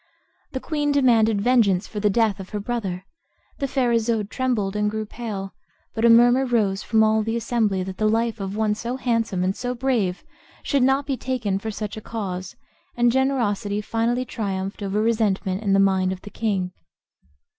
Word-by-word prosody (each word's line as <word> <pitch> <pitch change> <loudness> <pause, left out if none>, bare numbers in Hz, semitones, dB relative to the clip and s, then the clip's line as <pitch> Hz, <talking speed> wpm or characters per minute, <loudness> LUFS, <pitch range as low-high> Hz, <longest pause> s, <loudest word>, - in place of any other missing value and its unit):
The 260 - -2
queen 295 0 -1
demanded 225 -7 +3
vengeance 210 -5 +3
for 210 - -6
the 210 0 +2
death 215 -1 +1
of 190 - -8
her 210 - -3
brother; 200 -5 -3 0.5
the 275 - 0
fair 255 -3 +1
Isoude 225 -2 0
trembled 225 -7 -1
and 210 0 +1
grew 215 0 -3
pale, 210 -4 -6 0.4
but 225 - -3
a 235 - +6
murmur 240 +3 +6
rose 215 -6 +1
from 220 -1 +3
all 220 0 +3
the 225 +1 -2
assembly 220 -5 0
that 185 0 -7
the 215 0 +2
life 230 0 0
of 195 0 -4
one 215 -1 +1
so 235 +4 -4
handsome 230 -7 0
and 190 +1 0
so 250 0 -3
brave 235 -8 0 0.4
should 280 -2 +1
not 270 +2 +3
be 275 -2 -2
taken 230 -8 -2
for 220 - -5
such 210 0 -5
a - - -6
cause, 190 -5 -5 0.4
and 240 0 +4
generosity 230 -6 0
finally 230 +4 -1
triumphed 195 -3 -4
over 200 +1 -1
resentment 205 -4 0
in 200 -3 +1
the 195 - +4
mind 190 -1 +3
of 185 -1 -6
the 205 - -10
king. 195 -5 -1
220 Hz, 190 wpm, -23 LUFS, 195-240 Hz, 0.5 s, a